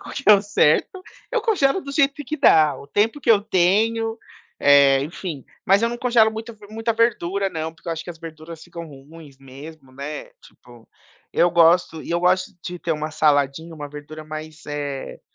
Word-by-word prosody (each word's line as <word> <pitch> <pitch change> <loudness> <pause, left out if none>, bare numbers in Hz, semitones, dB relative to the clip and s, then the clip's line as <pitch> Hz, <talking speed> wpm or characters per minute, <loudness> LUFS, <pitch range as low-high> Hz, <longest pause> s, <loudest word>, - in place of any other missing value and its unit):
qual - - -10
que 285 - -5
é - - +11
o 200 - +5
certo. 205 - +1 0.3
Eu 475 -3 0
congelo 385 - +2
do 280 - -8
jeito 280 -1 +2
que 300 +5 -4
dá, 160 - +4
o - - -12
tempo 220 - 0
que - - -7
eu 215 -3 +6
tenho, 220 +4 +1 0.4
eh, 140 -1 +5
enfim, 155 -2 -6 0.2
mas 195 +3 +4
eu 230 - +2
não 240 +1 -5
congelo 240 -3 +3
muita 225 +2 -7
ver 210 -2 -16
muita 225 +2 -2
verdura 200 -4 0
não, 160 -1 -5
porque 165 - -12
eu - - 0
acho 160 - -6
que - - -7
as 165 - -11
verduras 160 0 -10
ficam 170 -1 -9
ruins 145 0 -14
mesmo, 135 +1 -13
né, 140 +3 -7
tipo. 120 -2 -19 0.4
Eu 175 - +3
gosto, 170 -1 +3
e - - -9
eu 170 - +1
gosto 180 +1 +2
de 180 - -6
ter 170 - -5
uma 155 0 -4
saladinha, 150 +2 +1
uma 145 -2 -7
verdura 150 +2 -10
mais 155 +1 -9
eh, 145 -2 -5
170 Hz, 200 wpm, -22 LUFS, 150-220 Hz, 0.4 s, é